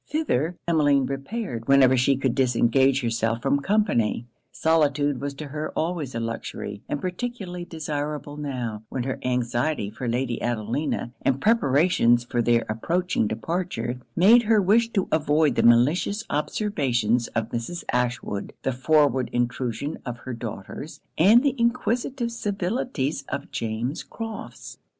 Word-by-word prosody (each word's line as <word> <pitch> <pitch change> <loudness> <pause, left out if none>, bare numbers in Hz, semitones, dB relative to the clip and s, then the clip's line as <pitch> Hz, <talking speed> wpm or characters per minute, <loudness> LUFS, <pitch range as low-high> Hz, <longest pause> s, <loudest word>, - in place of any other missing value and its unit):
Thither 180 - 0
Emmeline 145 -5 +3
repaired 135 - -4
whenever 135 -1 +6
she 130 +2 +3
could 130 -2 0
disengage 130 +2 +3
herself 115 -1 -1
from 140 +1 +2
company. 140 - +1 0.3
Solitude 145 -4 +1
was 140 0 -4
to 150 0 -7
her 150 +2 -4
always 160 -6 -2
a - - -1
luxury; 115 -3 -5
and 145 - -1
particularly 185 -1 -4
desirable 150 -2 -4
now, 125 -7 -4
when 130 - -3
her 130 +1 -3
anxiety 125 -1 -1
for 120 +3 -5
Lady 120 0 -1
Adelina, 120 +2 -2
and 135 0 +1
preparations 140 - +3
for 120 0 -1
their 120 0 +2
approaching 165 +5 0
departure, 125 - -3 0.2
made 215 +8 +7
her 220 -1 +3
wish 220 +4 +3
to 195 -3 +1
avoid 150 -2 +3
the - - +1
malicious 145 - +3
observations 130 - 0
of 115 0 -1
Mrs. 120 +10 -4
Ashwood, 125 -5 -2
the 135 - 0
forward 135 -1 +2
intrusion 125 +3 -2
of 120 -2 -5
her 130 - -4
daughters, 115 +5 -7 0.2
and 215 - +6
the 280 - +2
inquisitive 240 +1 0
civilities 195 - -2
of 140 - -5
James 115 +5 -3
Crofts. 225 -1 -8
140 Hz, 135 wpm, -25 LUFS, 120-175 Hz, 0.3 s, made